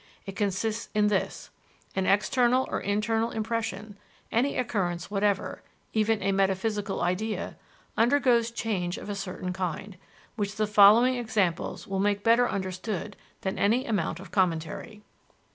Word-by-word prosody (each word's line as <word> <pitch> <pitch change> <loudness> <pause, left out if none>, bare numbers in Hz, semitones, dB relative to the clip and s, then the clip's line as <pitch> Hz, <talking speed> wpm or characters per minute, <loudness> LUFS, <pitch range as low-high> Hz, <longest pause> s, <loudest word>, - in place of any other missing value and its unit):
It 195 - -7
consists 210 +2 -1
in 210 -1 +4
this: 195 -2 -2 0.4
An 190 -1 0
external 245 +5 +3
or - - 0
internal 220 +3 0
impression, 220 -2 -3 0.3
any 255 +5 +1
occurrence 185 -8 -2
whatever, 205 0 0 0.3
even 220 -2 +1
a 195 - +2
metaphysical 195 +1 0
idea, 205 +5 -2 0.4
undergoes 240 -1 +3
change 195 -6 -2
of 205 - -6
a - - -3
certain 185 -2 -4
kind, 185 +2 -4 0.4
which 205 -1 -2
the 215 0 +1
following 210 +4 +7
examples 210 -8 -1
will 195 -3 -3
make 205 0 +1
better 235 +2 +4
understood 190 +1 -4 0.3
than 190 - -3
any 230 +6 +2
amount 200 -8 -1
of 190 - -11
commentary. 185 +4 -1
205 Hz, 135 wpm, -27 LUFS, 190-225 Hz, 0.4 s, following